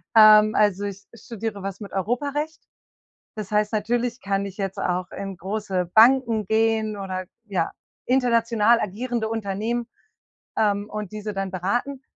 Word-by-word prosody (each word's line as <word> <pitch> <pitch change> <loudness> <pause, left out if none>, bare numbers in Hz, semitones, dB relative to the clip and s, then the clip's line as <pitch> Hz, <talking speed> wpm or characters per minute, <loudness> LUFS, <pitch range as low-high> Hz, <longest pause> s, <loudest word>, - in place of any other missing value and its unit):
Ähm, 215 0 +8
also 205 -1 +2
ich 200 0 -7
studiere 225 -3 -6
was 195 +2 -6
mit 200 - -8
Europarecht. 285 - -2 0.7
Das 210 -3 -6
heißt, 210 0 +1
natürlich 235 +3 -1
kann 200 0 -1
ich 195 +1 -9
jetzt 195 -1 -3
auch 180 0 -1
in 195 -1 -6
große 190 -2 -3
Banken 230 -1 +5
gehen 220 -1 +1
oder, 185 -1 -4 0.2
ja, 185 -5 -1 0.3
international 235 -3 +3
agierende 220 +3 -2
Unternehmen, 225 +2 -2 0.7
ähm, 205 -1 +1
und 210 -2 -6
diese 210 0 -5
dann 195 -1 -2
beraten. 240 +9 -2
215 Hz, 140 wpm, -24 LUFS, 195-230 Hz, 0.7 s, Ähm